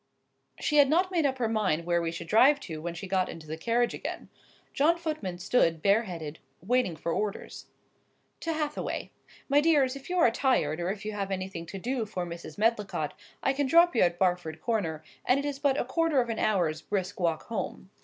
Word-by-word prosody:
She 300 Hz, -, +1 dB
had 285 Hz, -2 st, +7 dB
not 360 Hz, +5 st, +2 dB
made 330 Hz, -5 st, +2 dB
up 265 Hz, -1 st, -2 dB
her 240 Hz, -3 st, 0 dB
mind 195 Hz, -7 st, 0 dB
where 170 Hz, 0 st, +2 dB
we 165 Hz, -1 st, -1 dB
should 170 Hz, -, -6 dB
drive 255 Hz, -, +5 dB
to 160 Hz, -3 st, -6 dB
when 170 Hz, +1 st, -4 dB
she 180 Hz, +4 st, -6 dB
got 185 Hz, -1 st, 0 dB
into 165 Hz, -2 st, -9 dB
the 155 Hz, +1 st, -5 dB
carriage 235 Hz, +8 st, +1 dB
again. -, -, -6 dB, 0.4 s
John 315 Hz, +4 st, +3 dB
Footman 305 Hz, -, -4 dB
stood, 175 Hz, -4 st, +1 dB
bare 205 Hz, +4 st, +4 dB
headed, 160 Hz, -5 st, -6 dB, 0.2 s
waiting 230 Hz, -2 st, +1 dB
for 165 Hz, +2 st, -3 dB
orders. 210 Hz, +2 st, -4 dB, 0.7 s
"To 330 Hz, -, -2 dB
Hathaway. 300 Hz, -1 st, -3 dB, 0.4 s
My 285 Hz, +1 st, +4 dB
dears, 290 Hz, -5 st, +3 dB
if 275 Hz, +3 st, -10 dB
you 365 Hz, -, -1 dB
are 285 Hz, -9 st, +5 dB
tired, 225 Hz, -, +1 dB
or 175 Hz, +1 st, -1 dB
if 200 Hz, +1 st, -4 dB
you 215 Hz, -, -2 dB
have 200 Hz, -2 st, -3 dB
anything 185 Hz, -3 st, -4 dB
to 195 Hz, -, -6 dB
do 240 Hz, +2 st, -2 dB
for 185 Hz, -4 st, -3 dB
Mrs. 170 Hz, +2 st, -8 dB
Medlicott, 210 Hz, -8 st, 0 dB, 0.3 s
I 270 Hz, -, +2 dB
can 280 Hz, 0 st, 0 dB
drop 335 Hz, +2 st, +5 dB
you -, -, +4 dB
at 175 Hz, -1 st, +3 dB
Barford 175 Hz, -4 st, 0 dB
Corner, 165 Hz, -10 st, -2 dB, 0.2 s
and 250 Hz, -, +3 dB
it 280 Hz, -, -3 dB
is 285 Hz, -1 st, -3 dB
but 285 Hz, -1 st, +2 dB
a -, -, 0 dB
quarter 320 Hz, +2 st, +1 dB
of 240 Hz, -1 st, 0 dB
an 225 Hz, -, -2 dB
hour's 175 Hz, -7 st, +1 dB
brisk 200 Hz, +1 st, -3 dB
walk 165 Hz, -3 st, 0 dB
home." 205 Hz, -3 st, -5 dB
210 Hz, 215 wpm, -28 LUFS, 175-270 Hz, 0.7 s, had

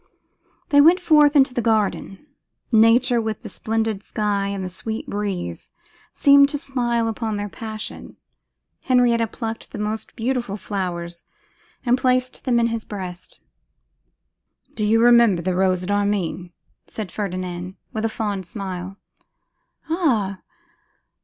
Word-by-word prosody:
They 285 Hz, 0 st, +6 dB
went 335 Hz, +5 st, +6 dB
forth 300 Hz, -4 st, +5 dB
into 270 Hz, -2 st, +5 dB
the 245 Hz, -, 0 dB
garden. 215 Hz, 0 st, -1 dB, 0.5 s
Nature, 235 Hz, +2 st, +4 dB
with 220 Hz, -1 st, -4 dB
the -, -, -7 dB
splendid 220 Hz, -2 st, -2 dB
sky 205 Hz, -2 st, -1 dB
and 200 Hz, -1 st, -3 dB
the -, -, -3 dB
sweet 220 Hz, +4 st, -4 dB
breeze, 195 Hz, -, -4 dB, 0.4 s
seemed 280 Hz, -1 st, +6 dB
to 290 Hz, -, -2 dB
smile 240 Hz, -5 st, -1 dB
upon 225 Hz, -1 st, -2 dB
their 205 Hz, 0 st, -4 dB
passion. 220 Hz, 0 st, -8 dB, 0.7 s
Henrietta 240 Hz, -3 st, +3 dB
plucked 225 Hz, 0 st, -6 dB
the -, -, -8 dB
most 210 Hz, +1 st, -4 dB
beautiful 235 Hz, -3 st, -2 dB
flowers 175 Hz, -4 st, -5 dB, 0.6 s
and 245 Hz, +1 st, +3 dB
placed 255 Hz, 0 st, 0 dB
them 245 Hz, -3 st, +3 dB
in 235 Hz, -, +3 dB
his 225 Hz, -1 st, -3 dB
breast. 185 Hz, -4 st, -8 dB, 1.3 s
'Do 215 Hz, -, -3 dB
you 225 Hz, +2 st, +4 dB
remember 235 Hz, -7 st, +5 dB
the 185 Hz, +1 st, 0 dB
rose 185 Hz, 0 st, +1 dB
at 190 Hz, -, -3 dB
Armine?' 200 Hz, -4 st, -1 dB, 0.4 s
said 210 Hz, -6 st, -6 dB
Ferdinand, 185 Hz, -2 st, -4 dB, 0.2 s
with 220 Hz, -, -3 dB
a 225 Hz, -, +1 dB
fond 205 Hz, -5 st, -3 dB
smile. 190 Hz, -2 st, -6 dB, 0.9 s
'Ah! 235 Hz, -, 0 dB
220 Hz, 135 wpm, -22 LUFS, 195-240 Hz, 1.3 s, They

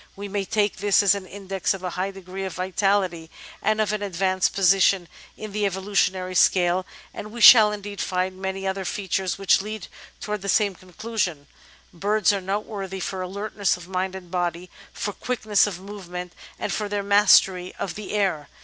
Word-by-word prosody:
We 200 Hz, +1 st, -6 dB
may 200 Hz, 0 st, -2 dB
take 205 Hz, 0 st, 0 dB
this 205 Hz, +1 st, +3 dB
as 200 Hz, -1 st, +5 dB
an 200 Hz, -2 st, -5 dB
index 195 Hz, 0 st, -2 dB
of 190 Hz, -, -10 dB
a 180 Hz, -, -3 dB
high 185 Hz, +3 st, -2 dB
degree 190 Hz, 0 st, -8 dB
of 190 Hz, -2 st, -5 dB
vitality 185 Hz, -2 st, 0 dB, 0.3 s
and 215 Hz, 0 st, +1 dB
of 215 Hz, -1 st, +1 dB
an 210 Hz, -, -2 dB
advanced 185 Hz, -1 st, 0 dB
posi 195 Hz, 0 st, +4 dB
tion 185 Hz, -2 st, +3 dB, 0.3 s
in 215 Hz, -1 st, -7 dB
the 210 Hz, +1 st, -2 dB
evolutionary 190 Hz, -1 st, -1 dB
scale, 180 Hz, 0 st, +3 dB, 0.3 s
and 210 Hz, -, -8 dB
we 235 Hz, -, -8 dB
shall 220 Hz, -2 st, +9 dB
indeed 205 Hz, -1 st, -6 dB
find 185 Hz, 0 st, -2 dB
many 190 Hz, 0 st, -3 dB
other 190 Hz, 0 st, -2 dB
features 190 Hz, -1 st, -2 dB
which 195 Hz, -1 st, +3 dB
lead 215 Hz, -1 st, -6 dB, 0.3 s
towards 210 Hz, -1 st, -4 dB
the 200 Hz, -, -4 dB
same 205 Hz, -2 st, +3 dB
conclusion. 185 Hz, -4 st, -4 dB, 0.5 s
Birds 205 Hz, +4 st, +2 dB
are 200 Hz, -, -2 dB
note 195 Hz, +3 st, -2 dB
worthy 195 Hz, -3 st, -6 dB
for 190 Hz, +1 st, -4 dB
alertness 200 Hz, +1 st, -1 dB
of 175 Hz, -1 st, -12 dB
mind 190 Hz, 0 st, -2 dB
and 180 Hz, -2 st, -10 dB
body, 175 Hz, -1 st, -2 dB, 0.2 s
for 205 Hz, -, -4 dB
quickness 215 Hz, -4 st, +1 dB
of 185 Hz, -4 st, -5 dB
move 195 Hz, -1 st, -10 dB
ment, 180 Hz, 0 st, -6 dB, 0.2 s
and -, -, -3 dB
for 210 Hz, -1 st, -2 dB
their 205 Hz, 0 st, -2 dB
mastery 195 Hz, -2 st, +4 dB
of 185 Hz, -, -4 dB
the 210 Hz, -1 st, -7 dB
air. 185 Hz, -8 st, 0 dB
195 Hz, 190 wpm, -24 LUFS, 185-205 Hz, 0.5 s, shall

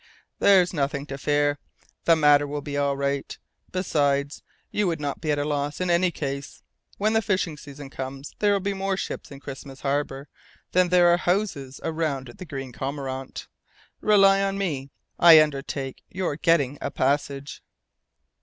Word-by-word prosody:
"There's 185 Hz, -3 st, +5 dB
nothing 140 Hz, -2 st, -1 dB
to 135 Hz, -2 st, -6 dB
fear. 145 Hz, 0 st, +1 dB, 0.5 s
The 165 Hz, -, +6 dB
matter 145 Hz, -2 st, +5 dB
will 145 Hz, 0 st, -4 dB
be 145 Hz, -1 st, -5 dB
all 140 Hz, -1 st, +1 dB
right. 140 Hz, 0 st, -2 dB, 0.3 s
Besides, 145 Hz, -6 st, 0 dB, 0.3 s
you 210 Hz, -2 st, +1 dB
would 165 Hz, -2 st, -1 dB
not 145 Hz, -2 st, -4 dB
be 155 Hz, -, -3 dB
at 145 Hz, -, +2 dB
a 145 Hz, -, -1 dB
loss 145 Hz, 0 st, -2 dB
in 180 Hz, -1 st, 0 dB
any 175 Hz, +1 st, +3 dB
case. 140 Hz, -4 st, -5 dB, 0.3 s
When 215 Hz, +2 st, +1 dB
the 225 Hz, -, +3 dB
fishing 190 Hz, -7 st, -1 dB
season 145 Hz, -1 st, -11 dB
comes, 135 Hz, +1 st, -6 dB
there 205 Hz, -1 st, +3 dB
will 200 Hz, -, +2 dB
be 200 Hz, +1 st, -1 dB
more 195 Hz, 0 st, -1 dB
ships -, -, -5 dB
in 140 Hz, -, -10 dB
Christmas 135 Hz, -1 st, -9 dB
Harbour 140 Hz, 0 st, -2 dB, 0.4 s
than 180 Hz, 0 st, +3 dB
there 175 Hz, -1 st, +5 dB
are -, -, +4 dB
houses 175 Hz, -8 st, -1 dB
around 155 Hz, -5 st, -2 dB
the 185 Hz, -, -7 dB
Green 135 Hz, -5 st, -6 dB
Cormorant. 135 Hz, 0 st, -5 dB, 0.5 s
Rely 195 Hz, -2 st, +5 dB
on 195 Hz, 0 st, 0 dB
me. 145 Hz, -9 st, -2 dB, 0.3 s
I 165 Hz, -2 st, +9 dB
undertake 140 Hz, -2 st, -2 dB
your 185 Hz, -5 st, -2 dB
getting 145 Hz, -4 st, +2 dB
a -, -, -2 dB
passage." 140 Hz, +1 st, -1 dB
145 Hz, 165 wpm, -25 LUFS, 140-180 Hz, 0.5 s, I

